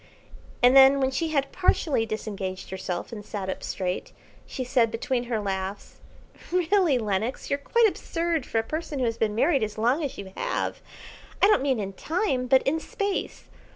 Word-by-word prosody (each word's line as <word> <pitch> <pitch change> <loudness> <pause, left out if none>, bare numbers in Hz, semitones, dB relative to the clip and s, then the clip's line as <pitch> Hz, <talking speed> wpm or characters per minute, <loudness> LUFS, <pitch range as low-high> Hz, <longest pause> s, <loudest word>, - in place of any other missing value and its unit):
And 250 +2 +7
then 270 +1 +8
when 265 -1 +1
she 295 +5 -1
had 280 -3 0
partially 285 -10 +1
disengaged 195 -4 -5
herself 185 0 -4
and 215 -3 -7
sat 200 -3 -4
up - - -6
straight, 180 -1 -3 0.3
she 260 - -4
said 240 -2 +2
between 240 +2 -2
her 235 -2 -1
laughs 195 0 -4 0.5
"Really, 360 -4 +3
Lenox, 215 +2 -2
you're 280 - +1
quite 465 +10 +3
absurd 335 -5 -2
for - - -2
a 225 - +2
person 310 +4 -4
who 255 - 0
has 230 0 -2
been 210 -1 0
married 275 +3 +3
as 215 -1 -3
long 245 +8 +2
as 280 - -4
you 190 -1 -8
have, - - -2 0.6
I - - +6
don't 420 -8 +4
mean 265 -4 +1
in 195 -1 -4
time, 285 - -1
but 260 +1 +5
in 315 +4 +1
Space. 400 +4 -3
250 Hz, 185 wpm, -26 LUFS, 215-310 Hz, 0.6 s, then